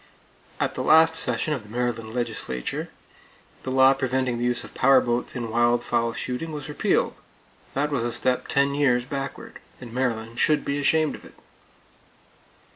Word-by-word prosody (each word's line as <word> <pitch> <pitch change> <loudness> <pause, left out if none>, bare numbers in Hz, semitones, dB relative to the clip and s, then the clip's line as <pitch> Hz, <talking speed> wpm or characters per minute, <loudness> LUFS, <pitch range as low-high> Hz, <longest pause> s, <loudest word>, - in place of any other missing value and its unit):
At - - 0
the - - -4
last 160 +1 +6
session 125 +1 +1
of 135 - -3
the 105 - -16
Maryland 115 -1 -2
legislature, 85 - -4 0.7
the - - -5
law 130 +1 +5
preventing 130 -2 -1
the - - -2
use 120 0 0
of - - -12
power 135 0 +5
boats 120 0 -2
in 120 -3 -4
wild 120 +1 +2
fowl 115 -1 0
shooting 125 +8 -4
was 150 -3 -6
repealed. 150 - 0 0.6
That 145 +2 0
was 130 -5 0
a 120 - -1
step 125 +2 -1
ten 140 0 +2
years 125 -4 +2
backward; 135 +1 -6 0.2
and 120 -2 -10
Maryland 115 -2 -2
should 150 -1 +2
be 140 +1 -1
ashamed 155 +2 +2
of - - -11
it! - - -15
125 Hz, 170 wpm, -24 LUFS, 120-140 Hz, 0.7 s, last